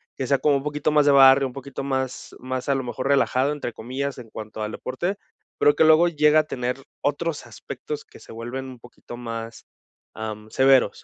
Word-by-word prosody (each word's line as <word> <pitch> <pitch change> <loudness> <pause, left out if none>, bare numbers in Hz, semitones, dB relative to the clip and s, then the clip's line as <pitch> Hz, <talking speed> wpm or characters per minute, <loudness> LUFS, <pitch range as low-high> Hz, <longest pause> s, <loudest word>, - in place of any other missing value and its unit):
que 130 - -3
sea 140 +1 +3
como 145 0 +2
un 135 - -5
poquito 150 +1 -1
más 150 -1 +4
de 145 - +7
barrio, 135 0 +7
un 125 - -10
poquito 135 0 -7
más 130 -1 -3
más 130 +1 -4
a 140 - +3
lo 135 - -2
mejor 125 +2 -4
relajado 140 0 +2
entre 140 -6 -4
comillas 130 +4 -4
en 115 -3 -11
cuanto 110 0 -8
al 105 - -3
deporte, 175 +10 -3 0.4
pero 145 - +4
que - - +4
luego 160 +2 +6
llega 150 -2 +4
a - - -9
tener 125 -3 -3 0.2
otros 150 +2 -2
aspectos - - -7
que - - -16
se - - -14
vuelven 120 +4 -6
un 130 -2 -10
poquito 120 0 -12
más, 115 -1 -7 0.5
am, 110 0 -7
severos, 135 -1 +3
135 Hz, 205 wpm, -24 LUFS, 120-145 Hz, 0.5 s, de